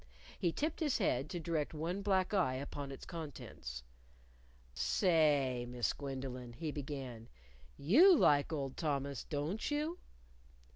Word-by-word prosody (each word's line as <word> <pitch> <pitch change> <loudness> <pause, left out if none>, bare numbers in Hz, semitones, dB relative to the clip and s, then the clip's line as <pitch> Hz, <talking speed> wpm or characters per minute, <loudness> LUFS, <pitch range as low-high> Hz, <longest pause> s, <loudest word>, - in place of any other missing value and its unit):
He 175 - +2
tipped 305 - -2
his 300 -5 +1
head 145 - +1
to 175 - -3
direct 160 -2 -2
one 170 +6 -2
black 190 -1 +1
eye 170 -10 +2
upon 140 +1 -5
its 135 - -8
contents. 135 - -7 0.9
"Say, 145 - +2
Miss 125 -3 0
Gwendolyn," 130 -3 -5
he 155 +4 -4
began, 135 -6 -6 0.5
"you 310 - +7
like 145 - +4
old 140 -4 -3
Thomas, 140 -4 -1
don't 155 +8 -2
you?" 305 +4 -1
150 Hz, 130 wpm, -35 LUFS, 135-180 Hz, 0.9 s, you